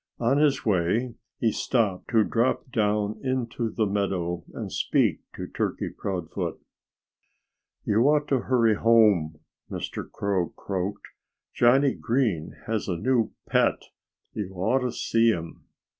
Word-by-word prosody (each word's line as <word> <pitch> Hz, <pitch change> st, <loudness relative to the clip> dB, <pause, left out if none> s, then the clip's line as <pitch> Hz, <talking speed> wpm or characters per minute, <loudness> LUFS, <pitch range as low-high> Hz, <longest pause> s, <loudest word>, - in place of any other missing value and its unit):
On 120 Hz, +4 st, +2 dB
his 140 Hz, -3 st, +2 dB
way 105 Hz, +5 st, +1 dB, 0.2 s
he 115 Hz, -, +1 dB
stopped 105 Hz, -6 st, 0 dB
to 110 Hz, -2 st, +4 dB
drop 120 Hz, +3 st, 0 dB
down 105 Hz, -2 st, 0 dB
into 125 Hz, -3 st, -1 dB
the 110 Hz, 0 st, 0 dB
meadow 95 Hz, -4 st, -1 dB
and -, -, -6 dB
speak -, -, +1 dB, 0.2 s
to -, -, -5 dB
Turkey -, -, -2 dB
Proudfoot. 90 Hz, -5 st, -4 dB, 1.3 s
"You 105 Hz, +2 st, +2 dB
ought 150 Hz, 0 st, +2 dB
to 135 Hz, -, +3 dB
hurry 120 Hz, -3 st, +3 dB
home," 105 Hz, -9 st, +3 dB, 0.3 s
Mr. -, -, -5 dB
Crow 95 Hz, -4 st, -1 dB
croaked. 100 Hz, +1 st, -4 dB, 0.5 s
"Johnnie 130 Hz, +3 st, +4 dB
Green 115 Hz, -, -1 dB
has 110 Hz, -2 st, -2 dB
a 90 Hz, -3 st, -1 dB
new 120 Hz, +3 st, +1 dB
pet. -, -, +2 dB, 0.5 s
You 95 Hz, -3 st, -5 dB
ought 95 Hz, +9 st, +1 dB
to 125 Hz, -1 st, -1 dB
see 115 Hz, -1 st, +2 dB
him." 85 Hz, -6 st, -3 dB
110 Hz, 130 wpm, -26 LUFS, 95-120 Hz, 1.3 s, to